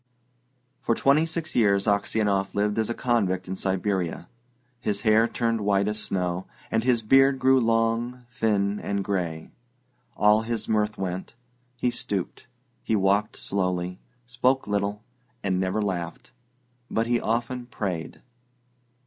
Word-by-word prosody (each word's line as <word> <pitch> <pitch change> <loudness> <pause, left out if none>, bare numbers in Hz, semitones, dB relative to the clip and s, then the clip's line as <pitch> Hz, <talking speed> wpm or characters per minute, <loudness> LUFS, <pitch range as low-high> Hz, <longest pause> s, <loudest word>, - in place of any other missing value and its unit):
For 115 - +1
twenty 145 +6 +3
six 165 -1 -4
years 100 -4 +3
Aksionov 100 -1 +1
lived 105 +1 +1
as 110 - 0
a 120 - -2
convict 100 -7 0
in 95 - -3
Siberia. 95 -3 -1 0.5
His 105 -5 -2
hair 110 0 +4
turned 115 -2 -1
white 100 -1 +2
as 105 0 -1
snow, 90 -2 -2 0.2
and 110 0 +1
his 120 -2 +2
beard 135 +4 +5
grew 130 0 +4
long, 115 +2 0
thin, 105 -4 0
and 100 -1 -2
grey. 85 -5 -3 0.7
All 105 +1 +5
his 115 0 -3
mirth 105 -1 +1
went; 95 +3 -4 0.4
he 125 0 +1
stooped; 100 0 -4 0.3
he 110 - 0
walked 100 +1 +2
slowly, 90 -1 -1 0.3
spoke 125 +2 +1
little, 105 +1 -1 0.4
and 95 -2 0
never 95 +3 0
laughed, 90 +1 -4 0.6
but 110 - 0
he 120 0 +1
often 120 +2 -2
prayed. 95 -8 -4
105 Hz, 135 wpm, -26 LUFS, 95-120 Hz, 0.7 s, beard